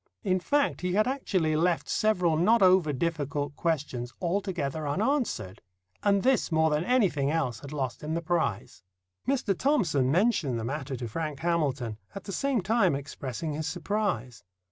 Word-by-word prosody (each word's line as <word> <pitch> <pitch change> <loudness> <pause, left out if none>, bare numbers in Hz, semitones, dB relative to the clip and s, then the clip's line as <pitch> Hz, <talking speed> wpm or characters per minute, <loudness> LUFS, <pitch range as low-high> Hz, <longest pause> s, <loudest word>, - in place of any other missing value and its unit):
In 185 -3 +1
fact, 285 +9 +1
he 180 0 -1
had 215 +3 +3
actually 190 - 0
left 170 +2 +1
several 180 -7 +2
not 205 +7 +4
over 185 -4 +5
difficult 145 -1 -2
questions 140 -7 -2
altogether 170 -5 -2
unanswered, 205 - -1 0.4
and 200 -1 +2
this 260 -8 +2
more 160 0 +3
than 150 +2 +1
anything 180 - +2
else 140 -7 -1
had 140 - -10
lost 130 -5 -3
him 155 +2 -3
the 170 - -1
prize. 150 - -1 0.5
Mr. 255 -7 +1
Thomson 170 - +2
mentioned 165 - +2
the - - -4
matter 135 +2 -3
to 120 -1 -5
Frank 150 +3 -4
Hamilton, 140 -10 -1 0.2
at 195 - -6
the 200 - -6
same 275 -2 0
time 190 -4 +2
expressing 140 +2 -5
his 155 +1 -3
surprise. 175 - -2
165 Hz, 160 wpm, -28 LUFS, 140-195 Hz, 0.5 s, over